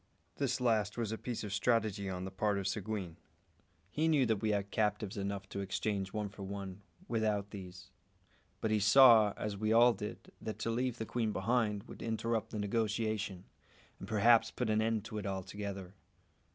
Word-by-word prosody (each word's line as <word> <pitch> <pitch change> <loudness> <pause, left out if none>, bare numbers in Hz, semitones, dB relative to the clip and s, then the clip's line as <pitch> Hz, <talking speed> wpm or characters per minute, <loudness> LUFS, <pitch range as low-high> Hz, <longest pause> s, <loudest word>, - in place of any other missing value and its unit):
This 135 -3 0
last 110 -4 +1
was 115 -3 -1
a - - -1
piece 120 -3 -4
of 105 -2 -4
strategy 105 -2 +1
on 90 0 -4
the 95 - -6
part 105 +1 0
of 100 -1 -2
Seguin. 95 -3 -3 0.7
He 155 +2 +1
knew 150 -5 +4
that 110 -3 0
we 110 - 0
had 100 -1 -1
captives 105 -1 0
enough 100 -1 -3
to - - -5
exchange 100 0 -2
one 105 -1 -2
for 100 0 -11
one, 100 0 -6 0.3
without 105 - 0
these; 90 -2 -9 0.7
but 110 - 0
he 110 - +3
saw, 110 0 +7
as 105 -1 -3
we 110 +2 0
all 120 +2 +7
did, 100 - -7
that 110 - -5
to 115 - -2
leave 125 +1 -1
the 110 - -3
queen 115 -1 -1
behind 105 0 0
would - - -11
interrupt 115 0 -1
the - - -5
negotiation, 105 -2 -1 0.6
and 95 - -8
perhaps 115 +2 +5
put 120 -3 -2
an 110 0 +2
end 110 -1 0
to 110 -1 -5
it 100 - -5
altogether. 95 0 -5
105 Hz, 185 wpm, -34 LUFS, 100-115 Hz, 0.7 s, saw